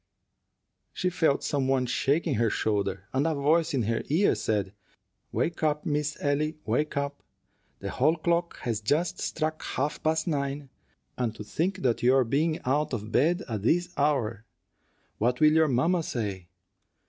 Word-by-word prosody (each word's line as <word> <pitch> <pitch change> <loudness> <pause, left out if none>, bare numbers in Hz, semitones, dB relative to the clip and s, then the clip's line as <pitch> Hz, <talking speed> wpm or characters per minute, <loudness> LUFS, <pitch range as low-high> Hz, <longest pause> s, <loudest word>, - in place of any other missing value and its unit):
She 180 -1 -1
felt 160 -5 +1
some 140 -2 0
one 135 -1 +2
shaking 140 +6 +1
her 115 +1 +2
shoulder, 100 -3 -1
and 135 +4 +2
a 160 - 0
voice 155 +4 +2
in 130 -4 0
her 115 +2 0
ear 170 +8 +3
said, 100 -3 -1 0.6
"Wake 170 - -1
up, 150 +1 0
Miss 150 -1 -1
Ellie, 150 +2 0
wake 140 +7 0
up. 140 0 -2 0.6
The - - -4
hall 155 +6 +3
clock 170 +1 0
has 115 -3 -2
just 150 +10 0
struck 155 0 -2
half 145 +3 -2
past 160 0 +1
nine, 140 -4 -2 0.5
and 115 -3 -1
to 105 - -7
think 180 - -2
of 120 -2 +2
your 130 +2 +5
being 155 +7 0
out 145 +3 +1
of 110 -1 -4
bed 165 - +2
at 110 -4 -3
this 175 - +1
hour! 120 -7 0 0.8
What 125 +3 +1
will 155 0 +6
your 160 0 +4
mamma 165 +7 +2
say? 100 - -4
140 Hz, 160 wpm, -27 LUFS, 120-155 Hz, 0.8 s, will